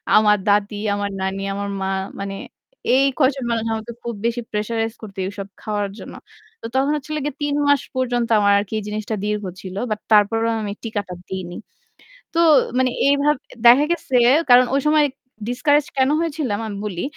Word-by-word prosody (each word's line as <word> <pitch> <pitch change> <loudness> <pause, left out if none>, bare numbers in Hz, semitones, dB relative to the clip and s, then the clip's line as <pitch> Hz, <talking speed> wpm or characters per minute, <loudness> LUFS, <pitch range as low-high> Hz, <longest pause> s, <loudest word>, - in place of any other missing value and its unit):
আমার 210 -1 +5
দাদি, 205 +1 +2 0.2
আমার 205 0 -2
নানি, 190 +1 -2
আমার 200 0 -4
মা 190 - -1 0.3
মানে 195 0 -4 0.6
এই 270 - +4
কয়জন 270 -1 +2
মানুষ 225 -1 -1
আমাকে 220 +1 -5
খুব 235 - -3
বেশি 235 +1 0
প্রেশারাইজ 225 +1 -2
করত 205 -3 -10
এসব 200 -1 -7
খাওয়ার 205 -2 -2
জন্য। - - -9 0.5
তো - - -9
তখন 270 +2 +2
হচ্ছিল 305 +1 -4
গে 295 - -1
৩ 290 -1 0
মাস 285 -2 +4
পর্যন্ত 245 -2 0
আমার 200 -1 +4
আরকি 205 +1 -5
এই - - -7
জিনিসটা 215 +1 -3
দীর্ঘ 210 0 -1 0.2
ছিল। 185 -1 -8
বাট 215 -1 -2
তারপরেও 225 +2 +4
আমি 205 -1 -3
টিকাটা 205 -5 -4 0.2
দেইনি। 185 -2 -5 0.8
তো - - 0 0.4
মানে 260 -1 +3 0.2
এইভাব 285 +1 +3 0.3
দেখা 250 +5 +8
গেছে 295 -6 -1 0.3
কারণ 245 +1 +8
ঐ - - +4
সময় 300 0 +4 0.4
ডিসকারেজ 290 +4 +2
কেন 265 0 +3
হয়েছিলাম, 290 -10 -2
আমি 205 -2 -5
বলি। 180 -4 -4
225 Hz, 170 wpm, -21 LUFS, 205-265 Hz, 0.8 s, দেখা